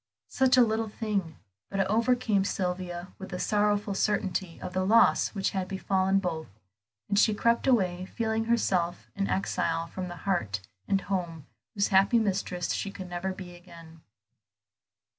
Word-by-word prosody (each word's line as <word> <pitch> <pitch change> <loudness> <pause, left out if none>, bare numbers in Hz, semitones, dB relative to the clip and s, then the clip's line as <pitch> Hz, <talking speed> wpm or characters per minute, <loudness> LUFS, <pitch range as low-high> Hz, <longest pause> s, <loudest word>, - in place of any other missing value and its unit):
Such 260 -1 +3
a 250 - +8
little 220 -1 0
thing: 200 -7 -3 0.3
but 195 - -3
it 195 - +3
overcame 225 -1 +2
Sylvia 180 -2 -3
with 190 - -7
the 180 - -4
sorrowful 205 0 +1
certainty 190 -3 -1
of 180 - -6
the 185 0 0
loss 225 +2 +4
which 195 - 0
had 190 -2 -2
befallen 190 0 +1
both, 170 -5 -2 0.6
and 200 - +2
she 215 -1 +4
crept 235 +4 +2
away, 185 -8 +2
feeling 225 0 -1
herself 185 -7 0
an 200 0 -1
exile 165 -3 0
from 180 +2 -6
the 175 - -7
heart 110 - 0 0.3
and 195 -1 +2
home 170 -6 -3 0.3
whose 200 -1 +1
happy 195 +4 +5
mistress 190 -5 -1
she 200 - -2
could 190 -2 -8
never 175 +2 -3
be 185 -1 -8
again. 165 -2 -14
195 Hz, 160 wpm, -28 LUFS, 180-210 Hz, 0.6 s, a